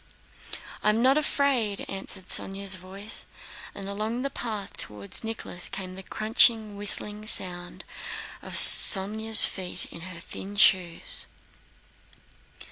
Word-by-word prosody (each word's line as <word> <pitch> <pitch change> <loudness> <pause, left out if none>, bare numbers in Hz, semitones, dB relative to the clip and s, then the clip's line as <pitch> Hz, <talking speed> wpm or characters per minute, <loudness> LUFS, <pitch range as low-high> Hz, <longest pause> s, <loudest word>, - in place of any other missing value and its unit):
"I - - +1
am 220 +3 0
not 265 +2 +3
afraid," 275 -8 -1
answered 195 0 -8
Sónya's 195 +1 -2
voice, 190 +3 -7 0.5
and 195 - -8
along 215 +5 -4
the 275 - -4
path 215 -6 -6
toward 105 - -8
Nicholas 220 -5 -5
came 190 -2 -7
the 190 - -9
crunching, 215 +1 +1
whistling 210 +1 +1
sound 175 -3 -1 0.6
of - - -10
Sónya's 215 +3 +7
feet 185 -2 -1
in 170 - -10
her 180 -1 -10
thin 195 +3 -10
shoes. 185 -5 +1
200 Hz, 120 wpm, -25 LUFS, 190-220 Hz, 0.6 s, Sónya's